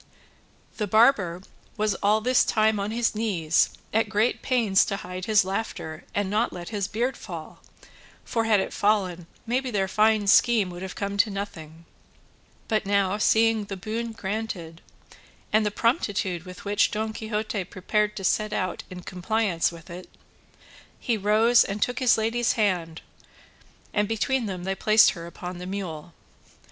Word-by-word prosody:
The 210 - -1
barber 205 -5 +3 0.3
was 215 -1 +1
all 210 +2 +3
this 250 +3 +3
time 215 -1 +2
on 200 +1 -2
his 230 +1 0
knees 185 -8 +1 0.2
at 220 -1 +2
great 215 +3 +1
pains 225 -7 +3
to 200 - -2
hide 180 -2 -6
his 215 -3 +4
laughter 190 -5 -4
and 205 -1 0
not 215 +4 0
let 175 -1 -7
his 205 -4 -2
beard 235 +5 -1
fall, - - -9 0.7
for 230 -2 -1
had 215 -2 +4
it - - -3
fallen 185 -5 0 0.2
maybe 255 +3 -1
their 195 -4 0
fine 215 +1 +3
scheme 205 -1 +4
would 175 0 -8
have 190 0 -6
come 200 0 -3
to 215 +2 +4
nothing; 165 -5 -7 0.8
but 215 -2 0
now 200 0 +1
seeing 225 -1 +3
the 195 -1 -6
boon 225 +4 -4
granted, 190 -6 -5 0.7
and 215 0 +4
the - - +2
promptitude 205 - -1
with 180 +2 -11
which 205 +1 +2
Don 220 +1 -3
Quixote 215 -2 -3
prepared 210 +3 -1
to 195 - -6
set 215 +2 +1
out 185 -3 -2
in 180 -1 -9
compliance 185 -2 0
with 170 0 -12
it, 180 +1 -9 0.9
he 235 - 0
rose 220 +3 +4
and 200 +1 -4
took 245 +4 0
his 255 -4 +4
lady's 230 +2 +1
hand, 180 -7 -1 0.9
and 210 -1 +1
between 225 +3 0
them 185 -3 -5
they 190 +1 -1
placed 215 +3 +5
her 170 -3 -8
upon 175 +1 -7
the 180 - -7
mule. 175 -5 -6
205 Hz, 160 wpm, -25 LUFS, 185-220 Hz, 0.9 s, placed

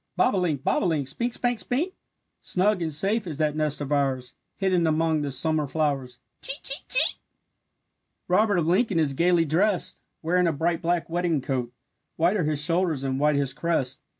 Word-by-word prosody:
"Bobolink, 170 -8 +1
bob - - +1
o' - - +1
link, 150 -5 -1
Spink, 235 - -2
spank, 245 -1 -1
spink; 280 - -2 0.5
Snug 190 +1 +1
and 160 -1 -2
safe 195 +7 +1
is 155 -4 -4
that 155 -1 0
nest 150 -1 0
of 145 0 -4
ours, 135 -4 0 0.2
Hidden 185 -4 +1
among 160 0 +1
the 145 - -2
summer 155 +2 0
flowers, 135 -5 -2 0.2
Chee, 275 - +2
chee, 275 - +2
chee!" - - +3 1.1
Robert 205 +2 +3
of 170 - +1
Lincoln 190 +3 +2
is 150 -4 +1
gaily 170 +3 +3
drest, 180 +5 0 0.2
Wearing 180 +2 +2
a - - +2
bright 165 +3 -1
black 175 0 0
wedding 170 -2 0
coat, 125 -2 -3 0.4
White 170 +5 +2
are 175 - 0
his 150 -1 0
shoulders 165 -4 0
and 135 0 -2
white 150 0 +3
his 140 -2 0
crest. 140 -6 -2
165 Hz, 180 wpm, -25 LUFS, 145-180 Hz, 1.1 s, chee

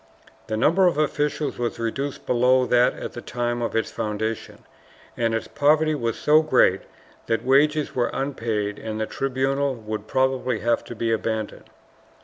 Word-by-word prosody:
The 110 - -2
number 170 - +4
of 175 - +1
officials 150 -1 -1
was 120 -1 -2
reduced 135 +5 -3
below 125 +1 +3
that 125 0 +3
at - - -7
the 120 - -7
time 120 0 -2
of 115 - -2
its 115 - 0
foundation, 110 +1 -4 0.5
and 115 -1 0
its 115 - -3
poverty 155 +2 +2
was 115 -5 -2
so 150 +6 +4
great 130 -10 +3 0.5
that 115 +1 -1
wages 150 +3 +3
were 120 -2 0
unpaid 115 -7 -2
and 110 -1 -5
the 110 - 0
tribunal 135 +2 -1
would 110 -2 -6
probably 130 -1 0
have 120 +1 +1
to 120 - -8
be 115 +1 -1
abandoned. 110 -1 -3
120 Hz, 160 wpm, -24 LUFS, 115-140 Hz, 0.5 s, number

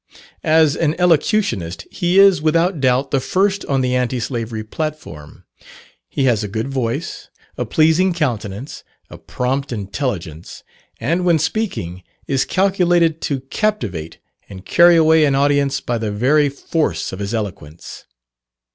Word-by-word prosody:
As 155 -1 +4
an 155 -1 0
elocutionist, 155 - +1
he 175 +1 0
is, 195 -5 +6
without 165 +2 +1
doubt, 130 +1 +1
the 135 - +2
first 195 +7 0
on 135 -1 0
the 125 0 0
anti 125 0 0
slavery 115 -2 -4
platform. 130 - -7 0.7
He 140 - -2
has 120 -5 +2
a - - -3
good 110 +6 -4
voice, 135 +4 -4 0.3
a - - -3
pleasing 160 +4 +3
countenance, 125 - -4 0.3
a - - -10
prompt 135 +2 -3
intelligence, 100 - -5 0.4
and 165 +10 0
when 175 -2 +3
speaking, 155 - -3 0.2
is 135 -2 0
calculated 175 -4 +2
to 140 -3 -2
captivate 125 - -3 0.3
and 95 -1 -11
carry 175 0 +5
away 160 -1 +5
an 140 -2 +2
audience 140 0 +2
by 120 -3 -2
the 110 -1 -2
very 140 +8 +2
force 140 - -2
of 95 - -7
his 100 +3 -3
eloquence. 90 -7 -7
140 Hz, 140 wpm, -19 LUFS, 110-165 Hz, 0.7 s, is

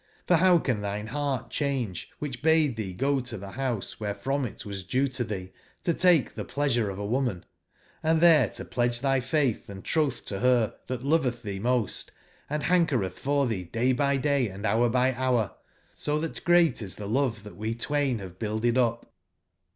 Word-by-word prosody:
for 175 - +4
bow 180 +1 +6
can 130 -8 0
tbine 105 +1 -3
beart 140 -2 -2
cbange, 130 - -2
wbicb 135 -4 -5
bade 160 -4 +3
tbee 95 -5 -5
go 140 +2 +2
to 125 -3 -6
tbe 100 +1 -9
bouse 125 -6 -2
wberef 105 -2 -5
rom 135 0 +1
itwas 100 -3 -7
due 135 +2 +2
to 130 -1 -2
tbee 95 -5 -5 0.3
to 170 - +2
take 175 -6 +3
tbe - - -6
plea 145 +1 0
sure 120 -5 +1
of 95 - -5
woman, 105 -2 -1 0.6
and 160 0 +2
tbere 155 - +6
to - - -5
pledge 120 0 0
tbyfaitb&trotb 135 -1 0
to 100 - -4
ber 125 -2 +3
tbat 130 -1 -4
lovetb 135 -5 +1
tbee 100 -2 -4
most, 120 -2 0 0.4
and 150 +1 -2
bankeretb 150 - +2
for 140 +4 0
tbee 95 -8 -3
day 125 +3 +2
bv 140 +1 +1
day 140 -4 +2
and 95 +1 -9
bour 115 +3 +3
by 125 +2 +3
bour, 125 -6 0 0.4
so 150 +1 -1
tbat 165 0 -4
great 175 -8 +4
is 95 -3 -5
tbe 105 - -6
love 115 -2 0
tnatwe 110 +2 -5
twain 140 -2 0
bave 95 -3 -9
builded 115 +3 0
up?'' 115 -1 +1
125 Hz, 180 wpm, -27 LUFS, 110-140 Hz, 0.6 s, bow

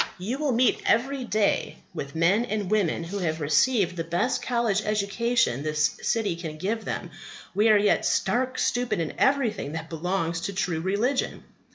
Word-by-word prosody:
You 220 +9 -4
will 300 -3 +1
meet 245 0 +2
every 265 +3 +1
day 215 -2 0 0.2
with 140 -3 -6
men 180 +8 +3
and 215 -5 -3
women 195 -6 +1
who 195 +5 -5
have 160 -3 -1
received 180 - +2
the 165 - -2
best 175 +10 0
college 235 -4 +1
education 215 - +1
this 155 0 0
city 220 -6 0
can 160 -2 -6
give 210 +6 -2
them, 175 - -4 0.4
who 210 +4 +3
are 215 -1 +6
yet 205 0 +2
stark 255 +1 0
stupid 245 -5 0
in 160 -2 -2
everything 235 - +1
that 160 0 -6
belongs 165 0 -2
to 200 - -3
true 180 -4 -1
religion. 210 +9 -1
200 Hz, 170 wpm, -26 LUFS, 165-235 Hz, 0.4 s, are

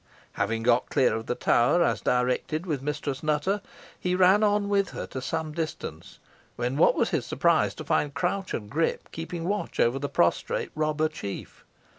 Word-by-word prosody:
Having 115 +2 -1
got 120 +1 +3
clear 135 -3 +3
of 110 0 -4
the 125 - -1
tower, 120 +11 +3
as - - 0
directed, 125 +6 0
with 150 -7 -2
Mistress 145 -1 -3
Nutter, 155 +7 0 0.4
he 180 0 0
ran 190 +3 +5
on 205 -1 +2
with 200 -1 +2
her - - -5
to 130 - -6
some 160 +3 -3
distance, 160 0 -5 0.4
when 125 +2 -2
what 150 - +5
was - - +1
his - - 0
surprise - - +2
to - - -7
find 145 - +1
Crouch 185 +2 -1
and 105 - -5
Grip 155 +9 -1
keeping 165 +1 -5
watch 205 +1 -2
over 120 +3 +3
the 145 0 -3
prostrate 85 - +1
robber 155 0 +1
chief. 100 -10 -7
155 Hz, 180 wpm, -27 LUFS, 125-175 Hz, 0.4 s, ran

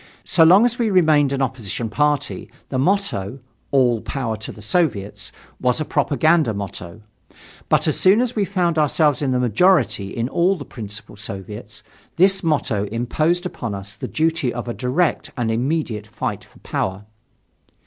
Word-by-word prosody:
So 165 - +4
long 185 +8 +7
as 245 0 -1
we 230 -2 +2
remained 155 -7 +4
an 135 -1 0
opposition 115 -4 -3
party, 145 +4 -1 0.2
the 130 - -1
motto 135 - 0 0.3
all 125 -5 +3
power 125 -5 -3
to 110 - -6
the - - -13
Soviets 110 - -1 0.3
was 125 +3 +1
a 155 - -1
propaganda 155 -5 +2
motto. 100 0 -7 0.7
But - - +3
as - - +1
soon 195 +4 +5
as 250 -1 0
we 210 - +1
found 180 -4 0
ourselves 150 -2 +2
in 140 - 0
the 125 - +1
majority 125 - +2
in 115 +4 -2
all 175 +7 +2
the 145 -6 -8
principal 105 -2 -9
Soviets, 105 +1 -8 0.3
this 190 +2 +4
motto 140 - 0
imposed 155 - 0
upon 115 - -4
us 100 0 -8
the - - -6
duty 160 -4 0
of 120 0 -5
a 120 - -2
direct 135 +8 0
and 115 -2 0
immediate 120 -3 -1
fight 105 - -4
for - - -22
power. 95 +2 -3
135 Hz, 165 wpm, -21 LUFS, 110-165 Hz, 0.7 s, long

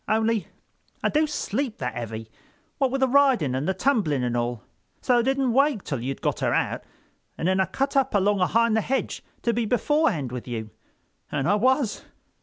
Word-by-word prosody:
Only 220 0 +1 0.6
I - - +3
do 305 +1 +2
sleep 260 -3 -2
that 125 -3 -3
heavy, 115 -1 -6 0.5
what 270 -2 +3
with 270 +1 -2
the 265 - +4
riding 255 - +3
and 130 +3 -2
the 190 - +2
tumbling 190 - +1
and 120 -1 -1
all. 120 -1 -2 0.4
So 250 -2 +3
I - - +4
didn't 265 0 +1
wake 275 -5 +2
till 135 -6 -3
you'd 135 +2 -4
got - - 0
her - - +1
out - - -1 0.5
and 165 - -1
then 190 +1 +2
I 190 - +4
cut 275 - -2
up 270 -4 +2
along 200 0 +3
ahind 225 +4 +3
the 220 - +3
hedge 265 +5 -2 0.2
to 235 - +2
be 235 0 0
beforehand 245 - +1
with 125 -1 -6
you. 110 -3 -5 0.6
An' 135 - -1
I 195 - +3
was. 240 0 +1
215 Hz, 200 wpm, -25 LUFS, -, 0.6 s, the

